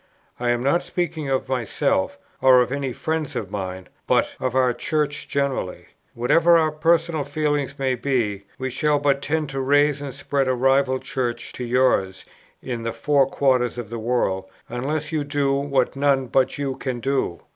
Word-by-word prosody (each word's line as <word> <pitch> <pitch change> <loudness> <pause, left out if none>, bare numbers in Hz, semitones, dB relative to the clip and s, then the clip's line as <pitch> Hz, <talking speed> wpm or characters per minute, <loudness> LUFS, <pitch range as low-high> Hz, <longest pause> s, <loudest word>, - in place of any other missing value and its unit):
I 120 0 0
am 120 0 +1
not 140 +6 +2
speaking 160 -5 -3
of 135 -1 0
myself, 275 - 0 0.2
or 130 -1 +7
of 125 0 +1
any 140 -1 -2
friends 160 +4 -3
of 100 -3 -4
mine; 95 -2 -5 0.2
but - - +2
of 130 -1 -2
our 130 -2 +3
Church 145 +2 -2
generally. 140 -9 -2 0.3
Whatever 165 +8 +4
our 160 -1 +2
personal 165 0 +1
feelings 145 -1 -1
may 135 -1 0
be, 120 -6 -1
we 130 -1 -3
shall 150 +3 +2
but 140 -1 +1
tend 155 0 -1
to 135 -1 -4
raise 145 +1 +3
and 140 -2 -6
spread 140 -1 -1
a 130 - +2
rival 135 +1 +3
Church 120 -3 -4
to 125 - -5
yours 120 -6 +1 0.4
in 120 -3 -4
the 115 0 -3
four 135 +3 +2
quarters 130 -3 +1
of 120 -3 -6
the 115 - -4
world, 110 -5 0 0.2
unless 145 +5 -3
you 155 -2 0
do 145 -1 0
what 140 -2 0
none 135 -1 +2
but 130 +2 +1
you 140 -2 -2
can 130 -3 -3
do. 135 -9 -1
135 Hz, 180 wpm, -23 LUFS, 125-145 Hz, 0.4 s, or